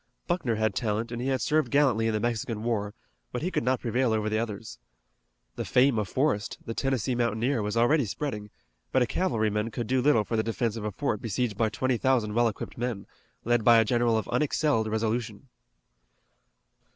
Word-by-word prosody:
Buckner 165 -10 0
had 110 -1 0
talent 110 +2 -2
and 120 0 -4
he 130 - -2
had 130 -1 0
served 155 -4 +1
gallantly 130 -6 +3
in 110 - 0
the - - +1
Mexican 115 -1 -2
War, 105 -3 -2 0.4
but 125 - -4
he 180 - -1
could - - 0
not 130 +1 +1
prevail 120 0 +1
over 110 -1 0
the 110 - +1
others. 110 - -5 0.8
The - - -2
fame 125 -2 +3
of 105 -3 -3
Forrest, 130 -5 0
the 115 - -4
Tennessee 130 -1 -1
mountaineer, 120 +1 0
was 105 +2 -2
already 135 +4 +3
spreading, 105 -3 -4 0.4
but 130 - +3
a - - +1
cavalryman 110 - 0
could 115 +1 -4
do 130 +2 +1
little 125 -5 +4
for 115 - -3
the 110 - +2
defense 115 0 -1
of 110 -2 -5
a 105 - -2
fort 105 -1 -2
besieged 115 0 -1
by 110 +2 +1
twenty 130 +2 0
thousand 120 -4 +1
well 120 +1 +3
equipped 110 +1 -6
men, 120 -5 -3 0.4
led 120 -1 +2
by 120 0 +7
a 115 - +4
general 120 0 +2
of 110 - -2
unexcelled 145 -6 +1
resolution. 110 +2 -2
115 Hz, 200 wpm, -27 LUFS, 110-130 Hz, 0.8 s, by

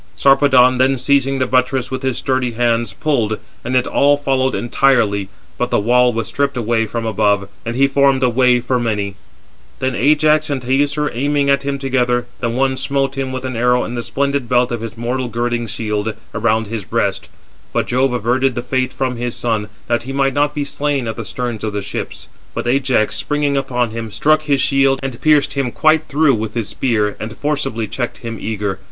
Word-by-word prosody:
Sarpedon 130 -2 +4
then 130 +1 +3
seizing 135 +1 +1
the 130 - +1
buttress 130 0 0
with 130 0 -3
his 130 -2 -1
sturdy 130 -3 -1
hands, 115 -2 +1
pulled, 110 -2 0 0.3
and 125 +2 -2
it 125 - +3
all 145 +1 +3
followed 135 -2 0
entirely; 115 -6 +1 0.3
but 125 - 0
the - - +2
wall 125 +3 +3
was 115 -1 -3
stripped 140 -2 -1
away 115 -1 0
from 115 0 -4
above, 100 -2 +1 0.2
and 115 - -2
he 135 +2 +4
formed 135 -1 +3
a - - +5
way 125 0 +3
for 125 +1 -1
many. 105 -4 -1 0.6
Then 130 0 -1
Ajax 150 +4 +3
and 140 -2 -1
Teucer 145 +3 +1
aiming 140 +3 +1
at 140 -1 +2
him 140 0 -2
together, 125 -3 0
the 120 - -1
one 130 +2 0
smote 135 0 -1
him 135 -1 -3
with 130 0 -5
an 130 -1 -4
arrow 125 +2 +2
in 120 - -5
the 120 - -2
splendid 140 0 -1
belt 125 0 +2
of 120 -2 -3
his 115 0 -7
mortal 125 +2 -2
girding 120 0 -2
shield, 105 0 -2 0.2
around 110 0 +1
his 110 0 -5
breast; - - -1 0.4
but - - 0
Jove 130 +2 +1
averted 125 +2 +1
the 120 - -3
fate 130 0 -1
from 130 -2 -2
his 120 0 -3
son, 110 -3 -1 0.2
that 120 0 0
he 130 +3 -6
might 135 -1 +1
not 145 +2 +1
be 145 - -1
slain 140 -2 -2
at 110 - -3
the 115 - -5
sterns 120 +1 -4
of 110 -2 -2
the 100 - -2
ships. 100 - -6 0.3
But - - -3
Ajax, 130 -3 +1
springing 145 -1 -1
upon 125 -4 -1
him, 115 0 -5
struck 155 +9 +2
his 145 -3 +1
shield, 135 0 +3
and 130 -3 -5
pierced 150 -2 +3
him 140 -3 -1
quite 155 +3 +3
through 150 0 +3
with 110 -1 -3
his 115 -3 -2
spear, 105 -5 0
and 110 0 -6
forcibly 135 -6 -1
checked 120 +2 -5
him 115 -1 -5
eager. 105 -3 -3
125 Hz, 205 wpm, -18 LUFS, 115-135 Hz, 0.6 s, a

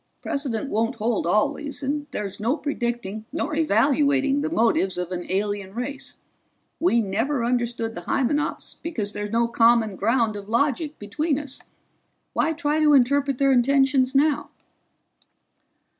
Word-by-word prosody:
Precedent 275 -4 -2
won't 225 +2 0
hold 220 -4 -1
always, 285 - 0
and 290 +2 -2
there's 205 -7 -5
no 235 +8 0
predicting 235 -7 -3
nor 315 0 -2
evaluating 280 +1 +2
the 305 - -1
motives 225 - +1
of 180 0 -3
an 175 -1 -4
alien 200 0 -2
race. 270 +3 -5 0.6
We 330 -9 +3
never 225 +6 -1
understood 235 -1 -1
the 175 - -6
Hymenops 290 +3 -1
because 220 -12 -3
there's 205 0 -4
no 230 +2 +2
common 230 -3 +3
ground 225 +2 +1
of 200 0 -8
logic 285 +5 0
between 285 +8 -1
us. 285 -2 -5 0.7
Why 320 - +1
try 310 -1 0
to 300 -1 +5
interpret 275 +1 +3
their 275 0 +3
intentions 270 +1 +3
now?" 290 +1 +2
245 Hz, 140 wpm, -24 LUFS, 220-285 Hz, 0.7 s, to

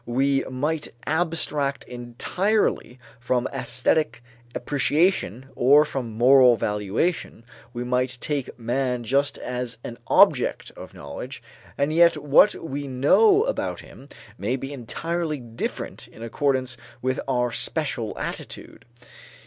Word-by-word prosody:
We 135 +3 +1
might 150 +4 -2 0.2
abstract 155 -4 -1
entirely 125 - -1 0.2
from 120 +1 0
æsthetic 130 +4 0 0.4
appreciation 145 - 0
or 145 +4 +5
from 130 -6 -5
moral 125 0 +6
valuation, 105 - -2 0.3
we 120 0 -4
might 125 0 0
take 140 -3 -3
man 125 +1 -1
just 135 +4 +1
as 125 -1 -4
an 120 0 -7
object - - +3
of - - -11
knowledge; 120 - -8 0.3
and 140 +2 0
yet 170 -1 +5
what 150 +7 +5
we 145 -2 -5
know 380 - +4
about - - -2
him 140 - -15 0.3
may 115 +6 -1
be 135 +2 -6
entirely 155 +5 -3
different 120 -3 -6
in 115 - -12
accordance 130 +1 -1 0.3
with 130 0 0
our 125 -2 +1
special 120 -4 -3
attitude. - - -7
130 Hz, 115 wpm, -24 LUFS, 120-150 Hz, 0.4 s, moral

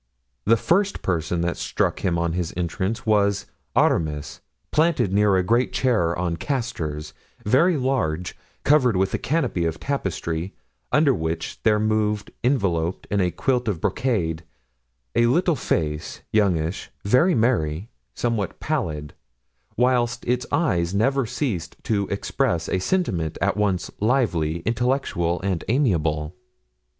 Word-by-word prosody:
The 115 +3 +5
first 195 - +1
person 85 -1 0
that 85 0 -1
struck - - -1
him 85 -2 0
on 85 -1 0
his 90 -2 -2
entrance 95 +6 -2
was 100 -2 +2 0.3
Aramis, 75 -3 +1 0.3
planted 150 - +2
near 105 -1 +4
a 95 - +3
great 120 +7 +2
chair 105 -10 +1
on 85 -1 -1
castors, 80 - -3 0.3
very 155 - +4
large, 90 - -1 0.3
covered 130 -8 +4
with 95 +1 +1
a - - 0
canopy 135 - 0
of 80 -1 -2
tapestry, 90 - -3 0.4
under 145 -3 +4
which 80 -3 -3
there 105 -1 +3
moved, 105 -1 0
enveloped 95 - 0
in 100 -1 +2
a 90 - +2
quilt 120 +8 0
of 100 -6 -1
brocade, 85 -9 0 0.7
a 120 - +4
little 170 +6 +3
face, 75 - -2
youngish, 90 -5 +1 0.2
very 130 - +4
merry, 105 -5 0 0.2
somewhat 115 -4 -2
pallid, 80 - -2 0.6
whilst 120 -1 +1
its 125 +1 0
eyes 95 - +1
never 135 +4 +2
ceased 110 - -3
to 100 -3 0
express 100 -3 -1
a 95 - 0
sentiment 90 - -1
at 100 +2 +1
once 100 -4 0
lively, 95 - +1
intellectual, 115 -7 0
and 95 -3 -1
amiable. 80 - +1
100 Hz, 130 wpm, -23 LUFS, 85-125 Hz, 0.7 s, The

